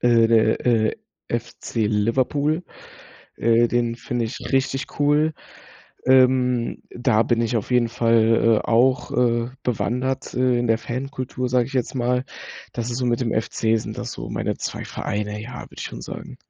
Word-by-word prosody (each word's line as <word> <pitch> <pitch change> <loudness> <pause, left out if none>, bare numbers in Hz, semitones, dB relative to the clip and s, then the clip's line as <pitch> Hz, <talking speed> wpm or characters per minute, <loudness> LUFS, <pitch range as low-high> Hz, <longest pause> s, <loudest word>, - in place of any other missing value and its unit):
Äh, 115 -2 +4
der, 110 -1 +3
äh, 115 -3 +2 0.3
FC 110 -2 -2
Liverpool, 135 +9 +1 0.7
äh, 115 +1 +4
den 120 -1 0
finde 120 -1 -2
ich 110 - -6
richtig 135 +2 -1
cool. 150 +2 +3 0.7
Ähm, 125 -2 +3
da 120 -3 +2
bin 115 -1 +1
ich 115 0 0
auf 110 - -5
jeden 120 -2 +3
Fall, 115 -1 +3
äh, - - -9
auch, 130 +5 +3
äh, 120 -3 +1
bewandert, 125 +2 -2
äh, 125 -1 +2
in 120 - 0
der 115 0 +3
Fankultur, 125 +1 -4
sage 125 -1 +2
ich 135 - -10
jetzt 130 0 -1
mal. 125 +1 0 0.5
Das 120 0 -3
ist 120 - -2
so 125 -1 0
mit 120 +1 +1
dem 115 -2 -1
FC, 110 0 0
sind 110 - -6
das - - -4
so - - -7
meine - - -2
zwei - - -4
Vereine, 105 +1 -3
ja, 125 +3 -7
würde - - -14
ich - - -4
schon - - -6
sagen. - - -8
120 Hz, 170 wpm, -23 LUFS, 115-130 Hz, 0.7 s, Äh